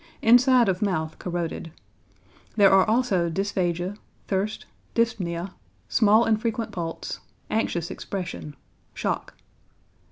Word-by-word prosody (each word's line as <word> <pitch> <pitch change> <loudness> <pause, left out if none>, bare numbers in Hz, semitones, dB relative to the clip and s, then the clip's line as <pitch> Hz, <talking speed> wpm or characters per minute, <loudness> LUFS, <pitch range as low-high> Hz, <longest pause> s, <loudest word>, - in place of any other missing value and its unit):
Inside 245 +1 +6
of 190 +1 0
mouth 160 -6 -1
corroded. 170 -2 -4 0.8
There 200 -3 +6
are 195 +1 +5
also 215 -8 +2
dysphagia, 185 0 -1 0.3
thirst, 200 +2 -2 0.3
dyspnoea, 195 -6 -1 0.4
small 220 +1 +5
and 220 -1 +2
frequent 230 0 -2
pulse, 165 -2 -5 0.3
anxious 175 -6 -1
expression, 180 -6 -6 0.4
shock. - - -3
195 Hz, 100 wpm, -25 LUFS, 175-225 Hz, 0.8 s, Inside